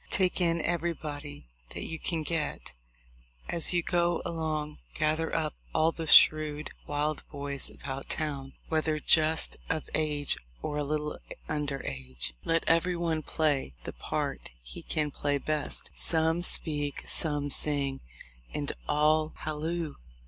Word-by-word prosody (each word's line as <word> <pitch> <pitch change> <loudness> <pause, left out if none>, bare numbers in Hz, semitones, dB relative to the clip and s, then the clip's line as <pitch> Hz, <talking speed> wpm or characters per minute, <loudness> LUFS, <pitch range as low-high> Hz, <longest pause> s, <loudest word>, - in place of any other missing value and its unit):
Take 185 -1 +2
in 170 -1 +2
everybody 155 - -3 0.3
that - - -3
you 160 -1 -5
can 165 -3 -1
get... 155 -1 -2 0.7
As 170 -2 +4
you 175 -2 +2
go 175 -1 +2
along 155 -3 -2 0.2
gather 155 +1 +1
up 155 -2 0 0.2
all 160 +1 +4
the 165 -1 -5
shrewd, 155 0 +6 0.2
wild 150 +1 0
boys 140 -2 -2
about 135 0 -6
town, 140 -3 -2
whether 155 -1 +1
just 160 +1 +4
of 160 -2 -1
age 150 -2 +1 0.2
or 150 0 -1
a - - 0
little 150 +1 -2 0.3
under 145 -3 -2
age. 65 -2 -3
Let 165 0 +2
every 170 +2 +3
one 165 -2 0
play 145 - 0
the - - -5
part - - -3
he - - -8
can 150 -1 0
play 145 0 0
best 150 +1 -2
— - - -28
some 160 +1 +2
speak, 145 -4 0
some 145 -2 +2
sing, 140 -2 0 0.6
and 145 -1 -1 0.2
all 155 +1 +3
halloo. 155 +1 -2
155 Hz, 140 wpm, -30 LUFS, 145-160 Hz, 0.7 s, shrewd